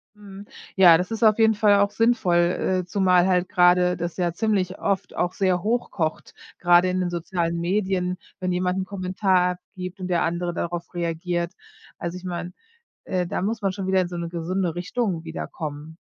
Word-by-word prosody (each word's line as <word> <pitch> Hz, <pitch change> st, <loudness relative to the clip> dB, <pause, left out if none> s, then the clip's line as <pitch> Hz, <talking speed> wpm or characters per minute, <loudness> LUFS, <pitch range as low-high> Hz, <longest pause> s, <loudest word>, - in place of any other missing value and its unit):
Mhm, 200 Hz, -1 st, -12 dB, 0.3 s
ja, 175 Hz, -4 st, +8 dB
das 180 Hz, +4 st, -3 dB
ist 225 Hz, +1 st, -3 dB
auf 215 Hz, 0 st, +5 dB
jeden 220 Hz, -1 st, +5 dB
Fall 205 Hz, -1 st, +4 dB
auch 200 Hz, -, +3 dB
sinnvoll, 225 Hz, -6 st, +2 dB
äh, 180 Hz, +1 st, +1 dB
zumal 180 Hz, -1 st, +3 dB
halt 180 Hz, -1 st, +1 dB
gerade 180 Hz, 0 st, +4 dB
das 170 Hz, -1 st, -4 dB
ja 175 Hz, -2 st, 0 dB
ziemlich 190 Hz, -2 st, -1 dB
oft 200 Hz, -1 st, -2 dB
auch 175 Hz, 0 st, -1 dB
sehr 185 Hz, -2 st, 0 dB
hoch 235 Hz, +3 st, 0 dB
kocht, 160 Hz, -3 st, -3 dB, 0.2 s
gerade 175 Hz, +1 st, +5 dB
in 185 Hz, 0 st, -1 dB
den 180 Hz, -1 st, 0 dB
sozialen 170 Hz, -1 st, -2 dB
Medien, 185 Hz, 0 st, -1 dB, 0.2 s
wenn 185 Hz, -1 st, -1 dB
jemand 180 Hz, +1 st, 0 dB
'nen 190 Hz, -, -2 dB
Kommentar 185 Hz, -1 st, +1 dB, 0.2 s
abgibt 185 Hz, +1 st, -7 dB
und 185 Hz, -, -4 dB
der 175 Hz, -1 st, +1 dB
andere 175 Hz, +1 st, -1 dB
darauf 170 Hz, 0 st, -4 dB
reagiert. 170 Hz, +1 st, -2 dB, 0.4 s
Also, 170 Hz, +1 st, -5 dB
ich 180 Hz, -, -12 dB
meine, 175 Hz, 0 st, -5 dB, 0.5 s
äh, 180 Hz, -1 st, -1 dB
da 180 Hz, -, -3 dB
muss 220 Hz, +2 st, -1 dB
man 195 Hz, -2 st, 0 dB
schon 190 Hz, -1 st, -5 dB
wieder 190 Hz, 0 st, +3 dB
in 180 Hz, -, -1 dB
so 175 Hz, -, -6 dB
'ne 170 Hz, 0 st, -4 dB
gesunde 175 Hz, 0 st, -2 dB
Richtung 185 Hz, -2 st, -2 dB
wieder 160 Hz, 0 st, -5 dB
kommen. 155 Hz, 0 st, -7 dB
180 Hz, 195 wpm, -24 LUFS, 175-190 Hz, 0.5 s, ja